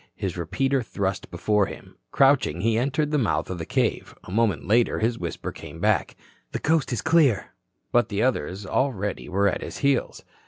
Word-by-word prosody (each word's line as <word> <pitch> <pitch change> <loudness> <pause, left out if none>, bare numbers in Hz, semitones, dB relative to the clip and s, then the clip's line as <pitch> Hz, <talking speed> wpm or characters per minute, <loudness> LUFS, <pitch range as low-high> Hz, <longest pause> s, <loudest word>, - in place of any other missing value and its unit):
His 95 -4 -3
repeater 135 +10 0
thrust 100 -4 -3
before 105 -2 +1
him, - - -11
crouching, 135 - +3
he 115 +2 +2
entered 140 +5 0
the 150 - +2
mouth 110 -5 0
of 90 - -4
the 80 - -5
cave. - - -1
A - - -10
moment 105 -7 +1
later 115 +3 +3
his 115 +1 0
whisper 85 -1 -4
came 75 +3 -10
back: 105 +2 +1 0.5
"Coast's 150 -6 +1
clear." 150 - +3 0.4
But 120 0 +3
the 105 0 0
others 100 - -1
already 105 -4 -1
were 100 +2 +2
at 100 - 0
his - - -6
heels. 140 -2 +1
110 Hz, 170 wpm, -25 LUFS, 95-130 Hz, 0.5 s, crouching